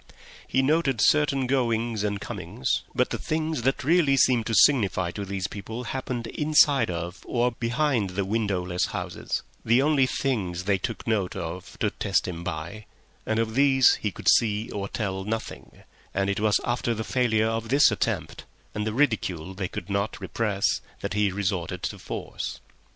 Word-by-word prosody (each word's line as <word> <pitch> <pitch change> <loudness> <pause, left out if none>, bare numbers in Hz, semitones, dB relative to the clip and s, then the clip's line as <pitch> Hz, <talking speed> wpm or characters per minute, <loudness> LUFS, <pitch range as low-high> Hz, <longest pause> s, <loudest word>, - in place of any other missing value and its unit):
He 135 - +2
noted 140 -4 +2
certain 140 0 +3
goings 115 -4 0
and 100 -1 -1
comings, 65 - -2
but - - +1
the - - -2
things 155 -3 -2
that 135 +3 0
really 150 -2 +4
seemed 125 -4 +3
to 115 - 0
signify 100 -11 +4
to 100 +2 -5
these 95 -1 -3
people 110 +6 -6
happened 125 -1 -4
inside 150 -1 +3
of 85 +2 -4
or 120 +1 +1
behind 120 -2 0
the 95 +2 -2
windowless 95 -4 0
houses—the 120 +3 -2
only 145 -3 +3
things 95 -12 -1
they 100 0 +1
took 115 - -4
note 105 -5 0
of 85 +2 -6
to - - +2
test - - 0
him 85 -2 -5
by—and 95 +6 -6
of 115 -1 0
those 135 0 +5
he 105 - 0
could - - -9
see 110 -1 +3
or 100 -1 -3
tell 95 -4 -3
nothing; 110 +2 -6 0.3
and 100 +1 +1
it 100 - -2
was 105 -1 +3
after 120 -1 0
the 110 - -3
failure 110 -3 +1
of 115 0 -2
this 140 +3 +5
attempt, - - -2 0.3
and 105 0 -2
the 110 - -2
ridicule 100 - 0
they 95 -1 -3
could - - -7
not 100 +2 -1
repress, 105 -4 0 0.2
that - - -3
he 105 -1 +2
resorted 95 -3 -2
to - - -3
force. - - -5
110 Hz, 165 wpm, -26 LUFS, 100-130 Hz, 0.3 s, those